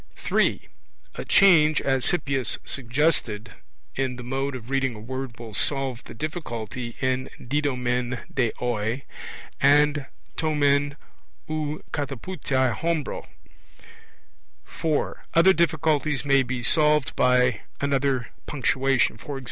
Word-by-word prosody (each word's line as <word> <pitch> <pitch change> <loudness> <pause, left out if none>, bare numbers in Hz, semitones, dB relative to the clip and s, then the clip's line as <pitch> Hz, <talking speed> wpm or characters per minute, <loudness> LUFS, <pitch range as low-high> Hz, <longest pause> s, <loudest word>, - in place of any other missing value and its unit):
(3) - - 0 0.5
A - - -6
change, 160 -6 +6
as 135 -2 +1
Hippias 135 -8 0
suggested, 120 -5 0 0.4
in 130 -1 -1
the 125 - -8
mode 135 +2 -2
of 125 +1 -8
reading 135 -3 0
a - - -9
word 130 +1 -6
will 115 -2 -9
solve 135 +1 0
the - - -10
difficulty 120 - -5
in 130 0 0
didomen 125 -2 -1
de 120 -4 +1
oi, 120 +1 -1 0.6
and 145 0 +4 0.3
to 155 -1 0
men 145 0 +2 0.5
ou 155 -1 -3
kataputhetai 135 -3 -1
hombro. 165 -4 -2 1.4
(4) 155 - -2
Other 175 +3 +7
difficulties 155 -4 +1
may 140 -1 +5
be 125 -1 -3
solved 150 +1 +3
by 125 -3 +3 0.2
another 135 -3 0 0.2
punctuation; 135 -1 +1
e.g. 140 -2 -5
135 Hz, 115 wpm, -25 LUFS, 125-150 Hz, 1.4 s, Other